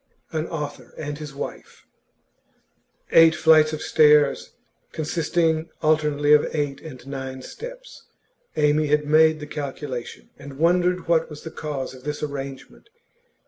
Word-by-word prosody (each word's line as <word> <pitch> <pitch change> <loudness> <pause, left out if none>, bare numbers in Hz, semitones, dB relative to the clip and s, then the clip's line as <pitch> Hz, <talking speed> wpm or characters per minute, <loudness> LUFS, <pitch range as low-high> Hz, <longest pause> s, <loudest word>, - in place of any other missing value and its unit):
AN 160 0 -2
AUTHOR 150 -3 -6
AND 145 -1 -5
HIS 150 -2 -8
WIFE - - -8 1.3
Eight 165 0 +7
flights 155 -1 +5
of 155 - -5
stairs, 150 -2 +4 0.4
consisting 160 0 0
alternately 150 -1 +3
of 150 - +4
eight 145 -2 -2
and 130 -6 -11
nine 135 -1 -6
steps. - - -10 0.5
Amy 150 0 +2
had 150 0 +2
made 155 +1 +4
the 150 - -7
calculation, 140 -4 -6
and 140 -1 -10
wondered 180 +2 +2
what 165 -1 +2
was 150 -1 -10
the 160 - -7
cause 145 -5 -5
of 130 -1 -14
this 150 +1 -4
arrangement. 140 - -7
150 Hz, 135 wpm, -23 LUFS, 145-160 Hz, 1.3 s, Eight